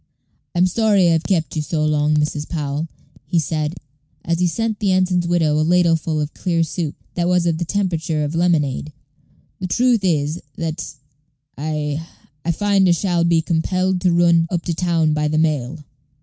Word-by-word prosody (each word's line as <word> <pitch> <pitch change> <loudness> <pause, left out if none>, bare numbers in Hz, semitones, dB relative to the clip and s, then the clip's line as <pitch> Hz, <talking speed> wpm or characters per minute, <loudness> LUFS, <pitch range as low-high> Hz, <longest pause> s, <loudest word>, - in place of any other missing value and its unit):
"I'm 175 +1 +4
sorry 200 -2 +3
I've 165 -1 +2
kept 170 -5 0
you 155 - 0
so 155 0 -1
long, 150 0 +2
Mrs. 150 0 -1
Powell," 150 -1 -3 0.4
he 175 - 0
said, 155 +1 -1 0.5
as 170 0 0
he 180 - +3
sent 220 +3 -2
the 200 -3 +1
ensign's 185 -2 +2
widow 160 -3 +2
a - - +3
ladleful 165 -2 +2
of 150 0 -3
clear 170 -3 0
soup, 160 -2 -3 0.2
that 175 -1 0
was 180 -1 +2
of 165 -2 0
the 170 - -1
temperature 165 -5 -1
of 145 +1 -3
lemonade. 155 -4 0 0.7
"The 185 - -3
truth 240 +2 +2
is, 155 -2 0 0.2
that 160 -2 -4 0.6
I 150 +1 -3 0.4
I 170 - +1
find 195 +2 +2
I - - +6
shall 175 -1 0
be 170 -1 +2
compelled 185 +2 0
to 180 -1 +3
run 170 -1 +4
up 175 -2 -2
to 170 - -2
town 165 -2 +1
by 150 0 0
the 155 +1 0
mail." 150 -2 -1
165 Hz, 180 wpm, -20 LUFS, 155-180 Hz, 0.7 s, I